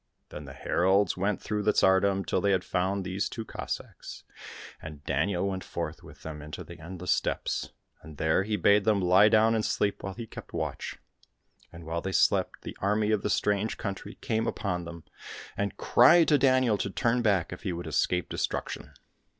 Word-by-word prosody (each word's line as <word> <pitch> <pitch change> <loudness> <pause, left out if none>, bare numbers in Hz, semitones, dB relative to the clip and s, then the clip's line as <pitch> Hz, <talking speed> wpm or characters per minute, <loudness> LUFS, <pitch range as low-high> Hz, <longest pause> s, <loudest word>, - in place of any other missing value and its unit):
Then 75 - -8
the 70 - -9
heralds 95 +8 +2
went 100 +2 -1
through 105 -1 -2
the 105 +1 +2
tsardom 95 +1 +3
till - - 0
they 100 -1 +2
had 95 -1 +1
found 95 +2 -1
these 95 +2 -2
two 115 - -6
Cossacks, - - -7 0.6
and 75 -2 -9
Daniel 95 -1 0
went 95 -1 -3
forth - - -5
with - - -15
them 75 -1 -7
into 75 +1 -7
the - - -12
endless 90 +2 -4
steppes, - - -1 0.3
and 80 -1 -12
there 80 +4 +2
he 105 +2 -1
bade 100 0 +4
them 105 -1 +3
lie 95 +3 +5
down 110 +1 +4
and 110 -1 +1
sleep 100 -1 0
while 95 -1 -5
he 115 - -6
kept - - -11
watch. - - -4 0.7
And 85 0 -11
while 85 +1 -3
they 95 - -4
slept - - +2
the - - -7
army 105 +2 +1
of 105 -2 +1
the - - -2
strange 105 +1 0
country 100 +1 -5
came 110 0 -1
upon 90 -4 -2
them, 85 -1 -9 0.5
and 100 0 -3
cried 160 +7 +5
to 150 -2 +5
Daniel 130 -5 +3
to - - -1
turn 120 +5 +1
back 100 -7 +1
if 90 - -9
he 95 - -2
would 85 0 -5
escape 90 -1 0
destruction. - - -4
100 Hz, 190 wpm, -28 LUFS, 90-105 Hz, 0.7 s, lie